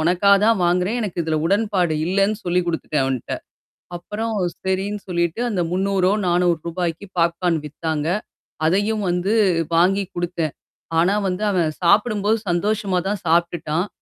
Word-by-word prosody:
உனக்காக 180 +5 +4
தான் 225 -1 +4
வாங்குறேன். 180 +6 +1
எனக்கு 195 -6 -3
இதில 160 -1 -1
உடன்பாடு 195 -3 +1
இல்லனு 195 +3 +2
சொல்லிக் 175 0 +1
குடுத்துட்டேன் 160 -3 -1
அவன்ட்ட. 130 -2 -2 0.6
அப்பறம் 215 +5 -4 0.3
சரின்னு 195 +2 -1
சொல்லிட்டு 170 +2 -1
அந்த 190 -5 0
300றோ, 190 0 +1
400றோ 175 -1 +3
ரூபாய்க்கு 170 +2 -3
பாப்கார்ன் 170 0 +1
வித்தாங்க. 155 0 -3 0.6
அதையும் 205 +5 +1
வந்து 180 +4 0 0.4
வாங்கிக் 190 +2 +2
குடுத்தேன். 170 -3 -2 0.5
ஆனா 180 +4 +3
வந்து 180 +3 -3
அவன் 170 -4 +1
சாப்பிடும்போது 210 +3 +3
சந்தோஷமா 195 +1 0
தான் 205 -1 -2
சாப்ட்டுட்டான். 170 0 +1
180 Hz, 130 wpm, -21 LUFS, 170-200 Hz, 0.6 s, உனக்காக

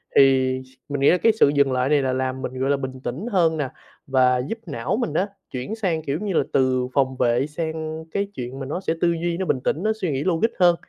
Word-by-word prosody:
thì 130 -1 +4 0.3
mình 140 -1 -2
nghĩ 140 - +6
là 180 - +4
cái 225 +5 +4
sự - - +6
dừng 140 -2 +3
lại 130 +1 +1
này 145 -1 +4
là 130 -1 0
làm 130 0 -2
mình, 130 0 -5
gọi 135 +1 0
là, 140 - +3
bình 130 -1 -5
tĩnh 135 - -4
hơn 165 -4 +3
nè, 145 -4 -1 0.4
và 130 -2 +4
giúp 225 - -3
não 140 - -2
mình 235 - -2
á, 185 +5 +1 0.2
chuyển 130 - -4
sang, 185 -8 -1
kiểu 145 0 -2
như 205 -1 -2
là, - - +3
từ 130 -2 +2
phòng 130 -2 +1
vệ 120 +3 +2
sang 160 0 -4
cái 200 +4 0
chuyện 125 0 -6
mà 135 - -4
nó 155 +7 -3
sẽ 165 - 0
tư 170 - +4
duy, 170 0 -1
nó 190 - -2
bình 135 - +1
tĩnh, 155 +7 -1
nó 215 - +2
suy 180 -5 0
nghĩ 135 0 -1
logic 185 +5 +2
hơn. 175 -1 +6
140 Hz, 260 wpm, -23 LUFS, 130-170 Hz, 0.4 s, nghĩ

